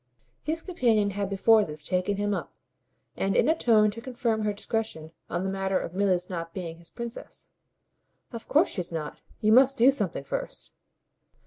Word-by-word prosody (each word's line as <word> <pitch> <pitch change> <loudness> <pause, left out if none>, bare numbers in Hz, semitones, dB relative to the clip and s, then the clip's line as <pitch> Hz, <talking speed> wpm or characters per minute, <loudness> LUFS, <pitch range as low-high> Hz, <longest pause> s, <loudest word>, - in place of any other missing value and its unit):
His 320 +2 -2
companion 230 - +2
had 200 0 -2
before 215 +2 +4
this 150 -4 -3
taken 185 +3 0
him 205 0 0
up, - - -4 0.6
and 195 - 0
in - - +4
a 320 - +5
tone 215 -8 +4
to 230 +2 -8
confirm 235 -3 -1
her 210 -1 +1
discretion, 205 -6 -4 0.2
on 175 +2 -2
the 190 - -1
matter 195 0 0
of 170 - -6
Milly's 185 -2 +1
not 165 -2 -6
being 170 -3 -6
his 170 - -10
princess. 235 -1 -8 0.8
"Of 230 - -7
course 310 +5 +4
she's 180 -3 -4
not. 155 -3 -5 0.2
You 215 -1 +3
must 265 +3 +6
do 255 +3 +6
something 205 - -3
first." - - -5
205 Hz, 180 wpm, -27 LUFS, 180-230 Hz, 0.8 s, must